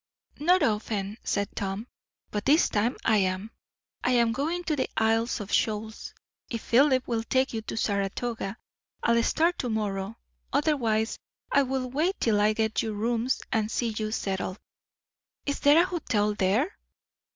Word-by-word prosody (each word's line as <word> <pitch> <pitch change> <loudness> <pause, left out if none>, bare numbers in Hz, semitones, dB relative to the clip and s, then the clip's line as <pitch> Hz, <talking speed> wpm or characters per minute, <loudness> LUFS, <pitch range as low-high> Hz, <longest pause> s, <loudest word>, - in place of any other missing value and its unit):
"Not 350 +3 +4
often," 210 -3 -1
said 200 -1 -1
Tom; 200 +2 -3 0.5
"but 210 -1 -3
this 300 +4 +5
time 220 +4 0
I 220 - +4
am. 190 +2 0 0.5
I 250 - +2
am 235 -2 +4
going 315 +8 -1
to 315 -2 0
the 260 - -1
Isles 225 +2 +2
of 205 -1 -6
Shoals. 220 0 -1 0.3
If 230 -2 -4
Philip 260 +1 +4
will 230 -2 0
take 260 +3 +1
you 225 - -2
to 220 - -6
Saratoga, 200 +1 -2 0.5
I'll 235 0 +4
start 335 +8 +2
to 250 - -1
morrow; 210 -1 -2 0.3
otherwise 245 -7 +1 0.3
I 280 - +5
will 265 -1 -1
wait 315 +10 0
till 210 -3 +2
I 210 +1 +4
get 220 0 0
you 220 -1 -3
rooms 230 +4 0
and 220 -1 +1
see 235 +1 0
you 215 0 -2
settled." 190 -2 -2 0.9
"Is 285 - -1
there 290 +3 +6
a 345 - +5
hotel 225 - 0
there?" 210 - +1
225 Hz, 160 wpm, -27 LUFS, 210-265 Hz, 0.9 s, there